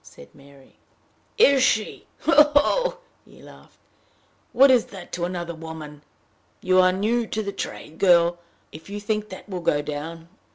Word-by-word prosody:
said 70 - -16
Mary. 140 -1 -20 0.6
"Is 280 - +5
she! 215 -3 0
ho! 300 -2 +5
ho!" - - +2 0.3
he - - -20
laughed. - - -17 0.7
"What 270 +2 +6
is 250 -3 +3
that 190 -3 -12
to 175 -1 -3
another 175 -1 -5
woman! 160 -2 -10 0.6
You 185 0 +2
are 185 0 +4
new 220 +5 -1
to 220 0 -3
the 200 - -4
trade, 195 -5 -7
my 160 - -18
girl, 175 -2 +3 0.3
if 160 +4 -13
you 205 +1 -5
think 215 0 -3
that 185 - -11
will 185 -3 -6
go 145 -3 0
down! 160 +3 -7
185 Hz, 165 wpm, -23 LUFS, 160-220 Hz, 0.7 s, What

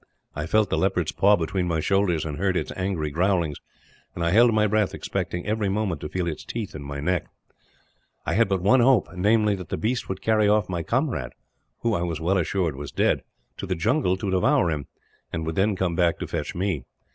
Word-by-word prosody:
I 75 +2 -3
felt 110 +1 +2
the - - +1
leopard's 90 -4 +1
paw 100 +2 +4
between 90 +1 -1
my 85 -2 0
shoulders, 90 -2 +1
and 75 -2 -5
heard 95 -1 +1
its - - -3
angry 90 -5 -2
growlings; 85 -2 0 0.6
and 85 - -2
I 85 - +2
held 120 +4 +6
my 110 -1 +3
breath, 105 -1 +1
expecting 90 0 -3
every 105 -1 0
moment 95 -7 -1
to 75 - -5
feel 90 -2 -2
its 80 -3 -4
teeth 115 -4 -5
in 75 - -7
my 70 0 -6
neck. 90 +4 -1 1.0
"I - - -1
had 115 -1 +3
but 95 -2 0
one 125 +7 +5
hope, 120 -4 +4
namely, 105 +3 +3
that 90 -3 -9
the - - -2
beast 120 +3 -2
would 95 - -5
carry 110 -2 +3
off 105 -1 +3
my 90 -2 -2
comrade 115 - -1 0.5
who, 115 -1 +1
I 85 - 0
was 85 -3 -2
well 90 +4 +1
assured, 85 -3 0
was 70 +1 -7
dead - - +1 0.4
to 95 - -5
the 90 - -1
jungle 105 - +1
to 95 +1 -3
devour 90 -2 +3
him, 75 -4 -3 0.4
and 80 -1 -3
would 80 - -2
then 100 +4 +1
come 95 -2 -1
back 85 -1 +2
to - - -5
fetch - - -4
me. 90 -6 -1
95 Hz, 220 wpm, -25 LUFS, 85-105 Hz, 1.0 s, held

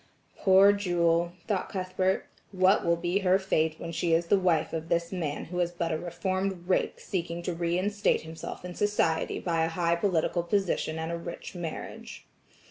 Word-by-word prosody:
"Poor 195 +1 +6
Jewel," 175 -3 +1
thought 205 -4 -1
Cuthbert, 185 0 -1 0.3
"what 190 +1 +4
will 170 - +3
be 175 +3 0
her 190 -1 +4
fate 160 -5 0
when 165 - -6
she 170 0 0
is 170 +1 +1
the 195 +3 +3
wife 180 -4 +1
of 160 0 -4
this 170 0 0
man 165 -6 -3
who 180 +1 -4
is 175 -1 +2
but 170 -1 -3
a 160 - 0
reformed 185 +1 -2
rake 185 - +1
seeking 170 -2 -3
to 180 - -2
re 170 +1 0
instate 205 +2 +1
himself 160 +2 -8
in 180 - -6
society 190 -5 +1
by 165 -2 0
a 165 - +1
high 170 0 +1
political 175 -1 +1
position 170 -3 0
and 160 +1 -3
a 170 - -2
rich 170 0 -7
marriage." 170 -3 -7
175 Hz, 185 wpm, -28 LUFS, 170-190 Hz, 0.3 s, Poor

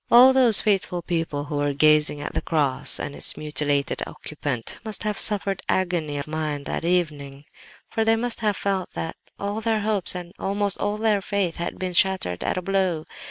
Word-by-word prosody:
All 255 +2 +8
those 245 -5 +5
faithful 190 -4 0
people 165 -4 -2
who 150 0 -4
were 145 -1 0
gazing 150 0 +3
at - - -5
the - - -1
cross 145 -5 +1
and 145 - -4
its - - -1
mutilated 145 -2 0
occupant 140 -6 -4
must 220 -2 -3
have 210 -1 -1
suffered 200 -2 +2
agony 175 -6 0
of 140 - -3
mind 155 -2 -3
that - - -3
evening; 150 -5 -1 0.4
for 225 - -1
they 225 0 +3
must 240 +1 -1
have 210 -3 0
felt 195 -2 -2
that 165 - -4 0.2
all 205 +2 -3
their 220 -1 0
hopes 205 -4 +4
and 175 0 -7
almost 200 0 0
all 205 +1 -1
their 215 -2 +1
faith 195 -4 -1
had 170 - -4
been 185 -1 -3
shattered 175 - +1
at - - -1
a 185 - -3
blow. 185 -4 0
180 Hz, 190 wpm, -24 LUFS, 150-205 Hz, 0.4 s, All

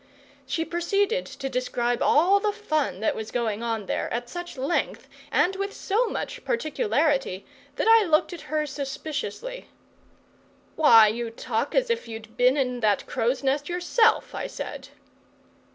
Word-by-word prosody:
She 325 - -1
proceeded 400 +8 0
to 270 - -6
describe 245 -1 -1
all 365 +7 +4
the 420 0 0
fun 310 - -2
that 220 - +1
was 220 0 -5
going 225 -3 -2
on 225 -3 -2
there, - - -2
at 240 +1 -3
such 350 +1 -7
length 275 +7 -1 0.2
and 380 +2 +2
with 395 +1 -3
so 445 +5 0
much - - -5
particularity 305 - 0 0.3
that - - -1
I 450 -3 +6
looked 315 +3 +2
at 345 - -10
her 305 0 0
suspiciously. 295 - -5 1.1
"Why, 230 -8 +7
you 230 +2 -2
talk 225 +3 -3
as - - +2
if 465 0 -2
you'd 220 0 -9
been 250 +3 +4
in 250 -3 0
that 210 -3 +1
crow's 245 +4 -1
nest 280 +3 0
yourself!" 360 +6 +2
I - - -3
said. - - -7
295 Hz, 150 wpm, -25 LUFS, 240-390 Hz, 1.1 s, Why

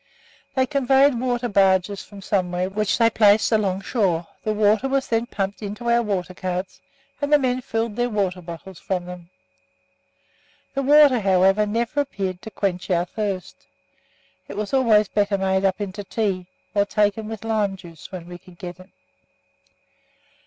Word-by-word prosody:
They 260 -1 +3
convoyed 275 0 +3
water 245 -1 -1
barges 195 -1 +2
from 200 -2 -12
somewhere, 185 -2 -1
which 210 0 0
they 230 -1 +4
placed 210 0 +4
along 195 -4 +1
shore; 185 -7 0 0.2
the 215 - 0
water 215 +4 +2
was 270 0 0
then 230 +1 0
pumped 200 -1 -3
into 215 +3 -3
our 235 0 +4
water 190 -5 -2
carts, 185 0 -4 0.4
and 285 0 -1
the 295 - +8
men 255 -2 0
filled 225 -2 -2
their 245 +1 0
water 190 -4 -1
bottles 170 +2 -9
from 180 -2 -3
them. 180 -1 -10 1.4
The 275 - -1
water, 285 -2 +6
however, 195 +1 +3
never 235 +7 0
appeared 190 -9 -4
to - - -8
quench 195 -4 -2
our 175 -1 +2
thirst. 195 -1 -5 0.8
It - - -8
was 210 +2 -4
always 225 -6 +4
better 205 0 +1
made 190 0 +1
up 190 +1 +1
into 205 0 -5
tea, 195 -3 -2 0.3
or 200 -1 +3
taken 210 +1 0
with 220 0 -7
lime 210 -3 0
juice 170 -4 -13
when 180 -3 -7
we 175 0 -9
could 180 -1 -17
get 175 +1 -8
it. 185 +1 -15
205 Hz, 165 wpm, -23 LUFS, 185-230 Hz, 1.4 s, the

